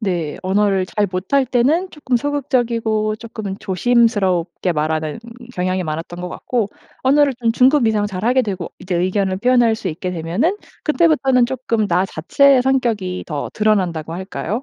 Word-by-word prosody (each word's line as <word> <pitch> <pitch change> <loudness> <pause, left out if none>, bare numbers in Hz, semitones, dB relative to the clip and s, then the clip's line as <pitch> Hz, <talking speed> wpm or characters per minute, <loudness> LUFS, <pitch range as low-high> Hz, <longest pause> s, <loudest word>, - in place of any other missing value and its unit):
네. 175 -8 -2
언어를 195 0 +1
잘 210 +1 0
못할 200 +9 0
때는 285 +10 +1
쪼끔 265 -5 -1
소극적이고 235 -6 0
쪼끔은 215 -3 -6
조심스럽게 195 -4 +1
말하는 155 +1 -2 0.4
경향이 185 0 -1
많았던 165 +2 -5
것 180 - -4
같고 230 +2 -2 0.3
언어를 280 +1 +4
좀 235 -2 0
중급 260 +1 +4
이상 210 -2 +1
잘하게 220 +7 +1
되고 190 -6 -4
이제 185 -1 -4
의견을 185 +1 0
표현할 240 0 +3
수 205 - -4
있게 180 +3 -4
되면은 180 - -1 0.3
그때부터는 300 -6 +3
쪼끔 235 -4 -1
나 180 +2 +2
자체의 255 - +3
성격이 230 -9 0
더 150 -3 -4
드러난다고 180 -7 0
할까요? 195 +6 -4
215 Hz, 355 characters per minute, -19 LUFS, 185-250 Hz, 0.4 s, 언어를